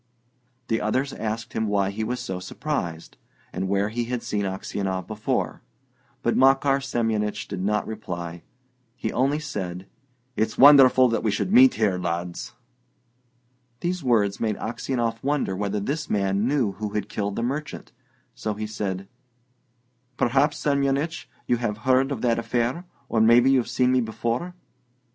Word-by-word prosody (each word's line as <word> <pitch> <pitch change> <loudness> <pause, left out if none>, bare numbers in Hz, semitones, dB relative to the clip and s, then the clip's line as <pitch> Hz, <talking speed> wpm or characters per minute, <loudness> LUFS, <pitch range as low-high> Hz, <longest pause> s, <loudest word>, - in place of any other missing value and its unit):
The 115 - 0
others 130 +6 0
asked 110 +1 -4
him 110 0 -1
why 100 -1 +1
he 110 +2 -3
was 125 +3 -2
so 95 -4 -4
surprised, 90 - -4 0.4
and 95 +1 -2
where 100 +1 +1
he 120 +2 -2
had 125 0 -3
seen 100 -1 -1
Aksionov 95 0 -3
before; 110 -1 -2 0.6
but - - +1
Makar 135 +1 +4
Semyonich 110 -5 -1
did 90 - -5
not 105 +2 0
reply. 85 -6 -6 0.5
He 125 - -3
only 135 +4 +2
said: 95 -12 -5 0.5
"It's 110 0 -1
wonderful 130 -2 +8
that 115 - 0
we 110 - 0
should 105 - -1
meet 255 +2 +7
here, 100 -5 +1
lads!" 85 0 -4 1.3
These 175 -1 -2
words 105 -6 +2
made 110 -3 -1
Aksionov 115 -1 -2
wonder 140 -9 0
whether 100 +1 -2
this 150 +9 -3
man 100 +1 +1
knew 130 -7 +1
who 105 +1 -5
had 105 -1 -1
killed 100 -1 -3
the 115 - -2
merchant; 145 +5 -4 0.4
so 110 -4 -3
he 110 +1 -4
said, 95 -3 -4 1.1
"Perhaps, 140 +5 +2
Semyonich, 140 +3 0 0.2
you 120 - +2
have 115 -3 -2
heard 130 +4 +2
of 125 -4 -4
that 115 -2 +2
affair, 120 +8 -1 0.2
or 110 - +1
maybe 120 +4 +6
you've 130 -3 +2
seen 125 0 +2
me 130 0 +3
before?" 120 - -3
115 Hz, 155 wpm, -24 LUFS, 100-130 Hz, 1.3 s, wonderful